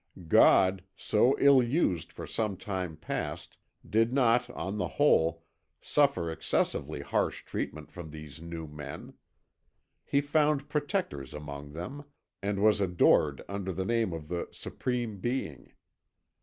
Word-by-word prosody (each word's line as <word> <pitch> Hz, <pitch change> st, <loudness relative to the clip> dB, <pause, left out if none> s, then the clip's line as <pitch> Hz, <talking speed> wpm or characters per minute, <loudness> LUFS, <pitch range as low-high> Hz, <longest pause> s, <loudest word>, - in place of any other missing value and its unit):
God, 95 Hz, +3 st, +5 dB
so 120 Hz, +5 st, +3 dB
ill 140 Hz, -2 st, +6 dB
used 120 Hz, -, 0 dB
for -, -, -8 dB
some 105 Hz, -4 st, -2 dB
time 95 Hz, -7 st, -4 dB
past, 85 Hz, -, -5 dB, 0.3 s
did 115 Hz, +2 st, +2 dB
not, 125 Hz, -2 st, +3 dB
on 100 Hz, +2 st, -4 dB
the -, -, 0 dB
whole, 80 Hz, +1 st, +3 dB, 0.4 s
suffer 135 Hz, -, +2 dB
excessively 80 Hz, -, -1 dB
harsh -, -, -1 dB
treatment 75 Hz, -1 st, -5 dB
from 85 Hz, -3 st, -8 dB
these 75 Hz, -1 st, -10 dB
new 85 Hz, -1 st, -6 dB
men. 75 Hz, -1 st, -8 dB, 0.9 s
He 140 Hz, -, +1 dB
found 145 Hz, 0 st, +1 dB
protectors 145 Hz, -, -2 dB
among 75 Hz, -1 st, -8 dB
them, 130 Hz, -, -6 dB, 0.4 s
and 100 Hz, 0 st, -1 dB
was 105 Hz, -1 st, +4 dB
adored 90 Hz, -2 st, +3 dB
under 100 Hz, -1 st, -3 dB
the 95 Hz, +1 st, -3 dB
name 115 Hz, -2 st, +1 dB
of 80 Hz, -2 st, -6 dB
the 85 Hz, +1 st, -3 dB
Supreme 120 Hz, -5 st, -3 dB
Being. 120 Hz, -, -3 dB
95 Hz, 130 wpm, -30 LUFS, 80-125 Hz, 0.9 s, ill